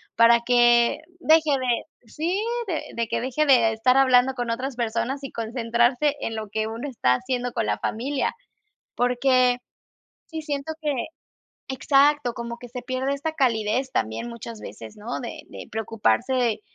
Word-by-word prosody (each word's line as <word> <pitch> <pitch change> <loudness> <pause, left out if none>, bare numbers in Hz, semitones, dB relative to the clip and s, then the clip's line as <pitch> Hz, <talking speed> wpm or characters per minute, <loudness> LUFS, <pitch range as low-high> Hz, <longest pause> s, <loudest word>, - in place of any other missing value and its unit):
para 230 +1 +6
que 240 +2 +4 0.2
deje 315 -2 +4
de, 255 -1 -2
sí, 340 - -1 0.3
de 335 -5 -1
de 235 -1 -1
que - - 0
deje 265 +5 0
de 240 -6 +5
estar 250 +4 +3
hablando 260 -1 +4
con 245 -2 -2
otras 255 +3 -3
personas 240 +4 -2
y 275 - -6
concentrarse 240 +4 +1
en 225 - -3
lo 215 -1 -5
que 215 +1 -1
uno 230 +5 -5
está 170 - +2
haciendo 250 - -2
con 230 -2 -1
la - - -1
familia, 265 +5 -1 0.6
porque 250 0 +3 0.7
sí 320 -1 -6
siento 295 +1 -4
que 300 -2 0 0.8
exacto, 275 0 +3
como 235 0 -6
que 245 - -10
se 245 +1 -7
pierde 260 +2 -1
esta 300 +3 -3
calidez 250 -1 0
también 110 - -2
muchas 235 -1 -8
veces, 110 - -10
¿no?, 220 +4 -5
de 240 - -7
de - - -9
preocuparse 220 - 0
245 Hz, 160 wpm, -24 LUFS, 230-270 Hz, 0.8 s, para